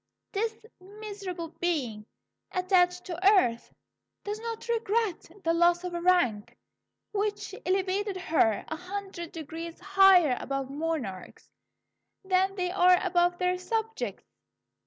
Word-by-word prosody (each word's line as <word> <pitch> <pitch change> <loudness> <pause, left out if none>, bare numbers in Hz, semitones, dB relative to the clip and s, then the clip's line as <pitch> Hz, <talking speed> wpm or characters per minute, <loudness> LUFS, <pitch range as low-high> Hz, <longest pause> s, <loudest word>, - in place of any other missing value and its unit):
This 445 +2 -3
miserable 390 -3 -7
being, 250 -12 -2 0.4
attached 360 -1 +2
to 370 +2 +2
earth, 235 -9 0 0.5
does 420 +1 -4
not 460 0 -6
regret 450 -4 -1
the 330 - +2
loss 345 +1 +3
of 360 -1 -4
a 345 - -3
rank 340 - +2 0.5
which 415 -1 -2
elevated 385 +1 0
her 320 - +1
a 315 - -4
hundred 365 -1 -6
degrees 330 +1 -7
higher 380 -6 +5
above 275 0 -3
monarchs 285 - -4 0.7
than 380 +1 +2
they 360 -2 -1
are 365 -1 +5
above 350 -1 +2
their 360 0 0
subjects. 450 +4 -3
365 Hz, 115 wpm, -28 LUFS, 335-395 Hz, 0.7 s, higher